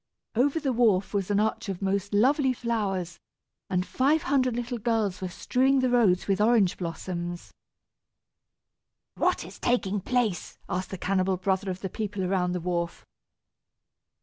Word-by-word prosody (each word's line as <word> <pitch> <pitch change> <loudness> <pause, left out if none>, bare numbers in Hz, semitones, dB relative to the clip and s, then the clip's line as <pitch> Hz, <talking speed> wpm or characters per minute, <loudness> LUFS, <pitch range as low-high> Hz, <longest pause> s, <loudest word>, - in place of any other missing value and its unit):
Over 275 +7 +2
the 275 -4 -1
wharf 215 -6 +2
was 200 -2 -1
an 205 0 +2
arch 220 0 -1
of 190 -2 -3
most 200 0 -1
lovely 260 +5 +3
flowers, 200 -8 -2 0.5
and 180 -1 0
five 290 +8 +2
hundred 255 -3 +1
little 240 0 -3
girls 215 -5 0
were 185 - -3
strewing 260 +8 +1
the 255 -1 +1
roads 210 -7 +3
with 195 0 +1
orange 215 -4 +4
blossoms. 175 0 -5 1.6
"What - - 0
is - - -12
taking 210 -5 +1
place?" 235 -5 -1
asked 185 0 -3
the 190 - -5
cannibal 185 0 0
brother 190 +1 -1
of 185 0 -4
the 195 - -2
people 205 -1 -3
around 180 -1 0
the 180 - -1
wharf. 170 -1 -3
200 Hz, 150 wpm, -27 LUFS, 185-240 Hz, 1.6 s, orange